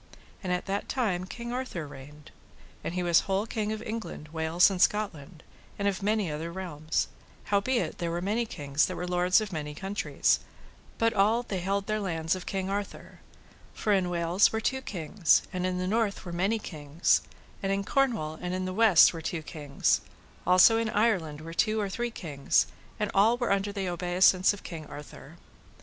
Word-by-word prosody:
And 185 - -2
at 180 0 -1
that 200 +1 -3
time 195 -8 0
King 235 +5 -6
Arthur 250 -11 -4
reigned, 145 +1 -12 0.5
and 170 - -4
he 180 - -1
was 170 -2 +5
whole 195 +2 +1
king 215 -1 -2
of 220 - -4
England, 220 -9 -6
Wales, 160 +4 +3
and 185 -2 -2
Scotland, 175 -7 0 0.3
and 200 - 0
of 200 0 -1
many 205 -4 0
other 160 +3 -4
realms: 165 -4 -2 0.3
howbeit 215 +5 0
there 170 -2 -1
were 170 +1 -2
many 215 +6 -1
kings 145 -4 0
that - - -5
were 180 - -4
lords 180 +3 +3
of 210 -3 -5
many 150 -2 -4
countries, 195 +4 0 0.6
but 230 0 +2
all 215 +4 +3
they 195 -6 -3
held 195 +2 -1
their 215 0 -1
lands 165 -5 -1
of 185 - -8
King 190 -1 -2
Arthur; 200 +1 -5 0.6
for 210 - +1
in 185 -2 +2
Wales 175 +2 +3
were 220 - -1
two 265 +4 -1
kings, 175 - +1
and 180 0 -1
in 180 0 -2
the 180 - -2
north 210 0 0
were 175 - -6
many 195 +6 +1
kings; 155 -5 0 0.4
and 195 - -1
in 195 0 0
Cornwall 200 - 0
and 180 0 -2
in 185 0 -2
the 185 - -3
west 210 -6 +6
were 165 - -6
two 160 0 -3
kings; 145 -3 0 0.5
also 185 +5 +7
in 230 -1 -1
Ireland 190 -10 +1
were 165 +1 -8
two 215 +5 +1
or 205 -2 -1
three 240 +5 -2
kings, 150 -11 0 0.3
and 210 -1 -1
all 220 +5 +4
were 245 -3 -1
under 200 +1 +1
the 195 -2 -3
obeissance 180 +1 +3
of 205 - -8
King 160 -3 -7
Arthur. 145 +2 -11
185 Hz, 190 wpm, -28 LUFS, 165-210 Hz, 0.6 s, also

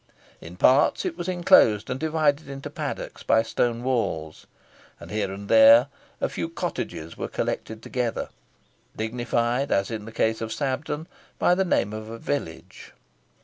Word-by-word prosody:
In 85 +2 -11
parts 135 - +4
it 180 -3 -2
was 175 0 -5
inclosed 170 - +4
and 125 - -3
divided 155 -2 0
into 135 0 -7
paddocks - - -5
by 115 0 +3
stone 120 +1 -1
walls, 110 -12 -2 0.5
and - - -11
here 105 -2 -1
and 100 +1 -8
there 115 +4 +7 0.3
a - - +1
few - - -4
cottages 80 +1 -5
were - - -3
collected 110 0 -4
together, 125 -2 -2 0.7
dignified, 120 +3 -1
as 100 +3 +1
in 110 -2 -5
the 110 - -9
case 110 0 0
of 110 -1 -4
Sabden, 150 +4 -3 0.3
by - - +3
the 190 +2 +2
name 105 - 0
of 110 0 -7
a 115 - -7
village. 115 - -5
115 Hz, 155 wpm, -25 LUFS, 110-140 Hz, 0.7 s, there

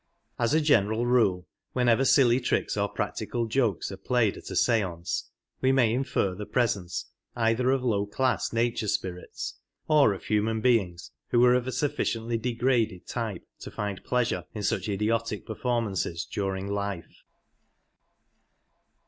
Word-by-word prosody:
As 120 +5 +2
a 160 - +4
general 115 -6 +3
rule, 100 -8 +2 0.3
whenever 125 +1 +3
silly 125 -3 +5
tricks - - 0
or - - 0
practical 120 -1 -3
jokes 115 -5 0
are - - -7
played 120 -5 +1
at - - -10
a - - -5
stance^ 90 -7 0 0.4
we 130 - +4
may 125 -4 +3
infer 125 -7 0
the 105 +3 -7
pres 120 -4 +2
86 - - -8
ence 90 0 -5 0.3
either 115 +2 +2
of 135 -1 +1
low 105 -5 +1
class 130 +3 0
nature 115 -1 0
spirits, 90 -2 -4 0.3
or 145 -9 +5
of - - -11
human 110 +1 0
beings 105 -8 +1 0.2
who 120 - +3
were 125 0 +6
of 125 0 +1
a - - -1
sufficiently 120 -4 -1
degraded 115 -5 0
type 110 -7 -4
to - - -8
find 100 -2 -4
pleasure 115 -8 0
in 105 - -4
such 105 - -1
idiotic 105 +2 -1
performances 110 -8 -2
during 95 -1 -3
life. 100 -3 -4
115 Hz, 150 wpm, -27 LUFS, 100-125 Hz, 0.4 s, were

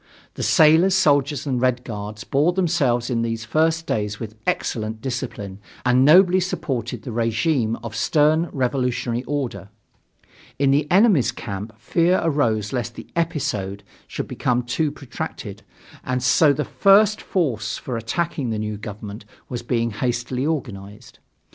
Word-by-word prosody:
The - - -7
sailors, 165 +5 +5
soldiers 145 -4 +2
and 130 -3 -1
the - - -5
Red 125 -1 +1
Guards 105 -1 -6
bore 150 +6 +2
themselves 145 -10 +1
in 115 -1 0
these 115 -1 -3
first 160 +6 +1
days 105 -4 -2
with 110 -2 -6
excellent 110 -1 -2
discipline 115 -6 -5 0.3
and 125 +1 +4
nobly 180 +5 +6
supported 135 - -3
the 125 - -6
regime 115 +1 0
of 115 -2 -6
stern 155 +2 +2
revolutionary 125 -2 -1
order. 135 -8 -4 0.9
In 140 -1 +3
the 145 +2 +1
enemy's 185 - +4
camp 105 -2 -6
fear 175 +2 +2
arose 115 -9 0
lest 120 -2 -3
the - - -10
"episode" 140 - -2 0.2
should - - -5
become 125 0 0
too 145 +5 -1
protracted, 140 -3 -7 0.4
and 130 -1 -2
so 145 +4 +5
the 150 +1 -1
first 205 +1 +4
force 130 - -1
for 125 - -5
attacking 130 +4 -2
the 110 - -2
new 105 0 -3
government 105 0 -8 0.3
was 120 -2 -4
being 115 -1 -1
hastily 120 +4 -2
organized. 110 -7 -5
125 Hz, 145 wpm, -22 LUFS, 115-155 Hz, 0.9 s, nobly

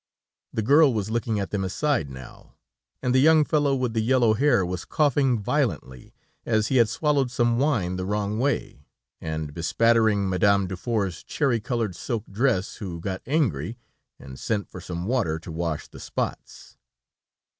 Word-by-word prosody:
The 110 - -2
girl 145 +4 +6
was 105 0 -2
looking 115 -2 -1
at 100 - -4
them 100 -2 -1
aside 95 - 0
now, 65 -2 -12 0.5
and 125 - +1
the 130 - +5
young 155 +1 +5
fellow 145 -3 +2
with 125 -3 -1
the 110 - +1
yellow 120 -1 +3
hair 120 -5 +3
was 90 0 -4
coughing 140 -4 +2
violently, 65 -10 -2 0.3
as 110 -1 +1
he 130 - +2
had 115 -3 +4
swallowed 140 +1 +1
some 120 -1 +1
wine 110 -11 0
the 90 - -3
wrong 105 +1 -1
way, 125 - -2 0.3
and 80 -2 -4
bespattering 105 +5 +2
Madame 100 +2 +3
Dufour's 95 0 -2
cherry 135 -6 0
colored 110 -4 -2
silk 115 +4 -3
dress, 105 -3 0
who 90 -5 -6
got 95 +2 -4
angry, 115 - 0 0.4
and 65 -1 -11
sent 105 -3 -2
for 90 - -8
some 85 0 -5
water, 110 -9 0
to 80 +1 -9
wash 80 -1 -3
the - - -13
spots. - - -5
110 Hz, 165 wpm, -25 LUFS, 90-125 Hz, 0.5 s, girl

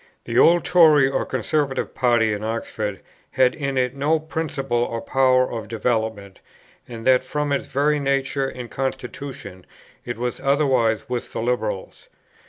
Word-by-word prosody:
The - - 0
Old 170 +1 +5
Tory 155 -6 +6
or 135 - -2
Conservative 135 +3 -1
party 120 -4 +2
in 105 0 -5
Oxford 110 -2 -4 0.3
had 130 -1 +3
in 140 -3 -3
it 125 +1 0
no 150 +4 +1
principle 145 -6 -2
or 115 -1 -3
power 130 0 +2
of 115 -2 -5
development, 110 -3 -2 0.5
and 115 -2 -9
that 130 -1 +4
from 145 +2 -2
its 140 - -1
very 145 +2 +1
nature 135 0 0
and 125 -2 -8
constitution: 130 -7 -5 0.4
it 120 -2 -5
was 125 +1 -3
otherwise 135 -5 +1
with 125 -2 -4
the - - -3
Liberals. 110 -5 -3
130 Hz, 150 wpm, -22 LUFS, 115-140 Hz, 0.5 s, Tory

